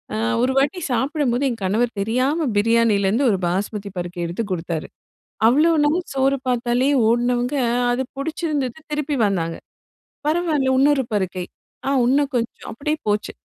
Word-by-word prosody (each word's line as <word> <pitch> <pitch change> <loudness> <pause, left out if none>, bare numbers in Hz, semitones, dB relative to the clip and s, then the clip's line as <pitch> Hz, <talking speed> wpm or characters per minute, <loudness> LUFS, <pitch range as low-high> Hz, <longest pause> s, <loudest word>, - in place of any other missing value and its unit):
அ - - -1 0.2
ஒரு 255 - +2
வாட்டி 285 +7 +2
சாப்பிடும்போது 270 -1 0
எங்க 235 -4 -3
கணவர் 230 +5 +1
தெரியாம 260 +9 0
பிரியாணிலருந்து 225 +1 +3
ஒரு 195 - +1
பாஸ்மதி 200 +3 -2
பருக்கை 175 0 -5
எடுத்து 175 +7 -3
கொடுத்தாரு. 165 -3 -3 0.6
அவ்ளோ 300 +8 +5
நாள் 310 +5 +2
சோறு 270 +1 +2
பார்த்தாலே 245 +2 +1 0.2
ஓடுனவங்க 245 +3 +1 0.4
அது 255 +2 0
புடிச்சிருந்தது 295 -3 -2
திருப்பி 295 -1 -1
வந்தாங்க. 165 -4 -1 0.7
பரவால்ல 310 -5 +1
இன்னொரு 280 -1 +3
பருக்கை, 185 -2 -1 0.4
ஆ - - +1 0.2
இன்னும் 280 +2 +2
கொஞ்சம் 235 -1 -4
அப்டியே 300 +7 -2
போச்சு. 210 0 -1
245 Hz, 135 wpm, -21 LUFS, 205-285 Hz, 0.7 s, அவ்ளோ